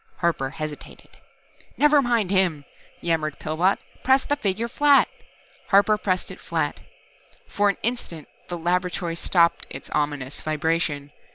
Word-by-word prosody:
Harper 165 -6 0
hesitated. 155 0 -8 0.7
"Never 295 0 +5
mind 235 -7 +1
him," 175 -7 +1 0.4
yammered 155 -3 -1
Pillbot. 165 +5 +1 0.3
"Press 265 +1 +4
the 290 - +1
figure 220 -3 -1
flat!" 285 +3 +5 0.6
Harper 205 +2 +5
pressed 185 -3 -1
it - - -10
flat. - - -2 0.7
For 205 0 +2
an 200 - -1
instant 215 -10 -3 0.2
the 175 - -4
laboratory 175 0 -1
stopped 170 0 +2
its 135 - -9
ominous 145 -2 -2
vibration. 155 -2 -1
175 Hz, 125 wpm, -24 LUFS, 155-210 Hz, 0.7 s, Never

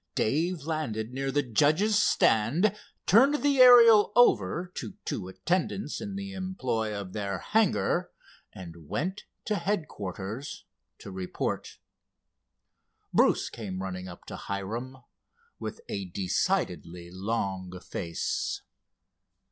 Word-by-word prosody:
Dave 160 +7 0
landed 125 -8 -3
near 135 +1 -2
the 145 +1 +1
judges' 155 - +3
stand, 165 - +3 0.3
turned 270 +9 +5
the 285 -2 +3
Ariel 230 -5 +8
over 175 - +3
to 110 - -6
two 90 - -3
attendants 160 - -2
in 205 -3 -5
the 195 0 -5
employ 130 - -2
of 95 -2 -8
their 100 -2 -2
hangar, 190 - +1 0.4
and 85 -4 -11
went 185 +7 -3 0.2
to 210 -2 0
headquarters 125 - -4 0.3
to 100 - -10
report. 95 -1 -4 1.4
Bruce - - +3
came 95 -5 -5
running 95 -1 -5
up 90 - -11
to - - -7
Hiram 115 +7 -5 0.6
with - - -6
a 100 -1 -4
decidedly 90 -1 -2
long 95 -2 -3
face. 85 -2 -3
125 Hz, 110 wpm, -28 LUFS, -, 1.4 s, Ariel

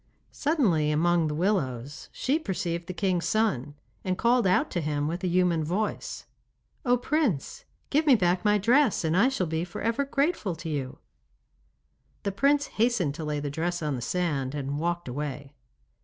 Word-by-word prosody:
Suddenly, 220 - +1
among 165 +2 +2
the 150 - -2
willows, 145 - -1
she 280 +5 0
perceived 175 - -3
the - - -3
king's 180 -2 0
son, 145 - 0 0.3
and 185 -1 -1
called 235 -1 +3
out 185 - +2
to 175 - -1
him 150 -1 -1
with 170 +4 -4
a - - +1
human 175 -2 +2
voice: 190 +8 -3 0.6
'Oh 245 -1 +3
Prince, 300 - -1 0.3
give 305 +2 +2
me 270 - +8
back 180 -2 +1
my 210 -1 +4
dress, 240 +3 +3
and 160 +1 +1
I 215 +8 +5
shall 230 -9 -1
be 160 0 -2
for 175 -1 -7
ever 230 +5 +1
grateful 275 - 0
to 165 0 -7
you.' 135 -4 -3 1.3
The 200 - -1
prince 280 +8 +2 0.2
hastened 220 - +2
to 160 +2 -6
lay 150 -1 -2
the 145 -1 -4
dress 170 +3 -2
on 150 -2 -1
the 125 - -5
sand, 145 -2 -1
and 140 0 -3
walked 170 0 -2
away. 140 +1 -5
175 Hz, 175 wpm, -27 LUFS, 150-225 Hz, 1.3 s, me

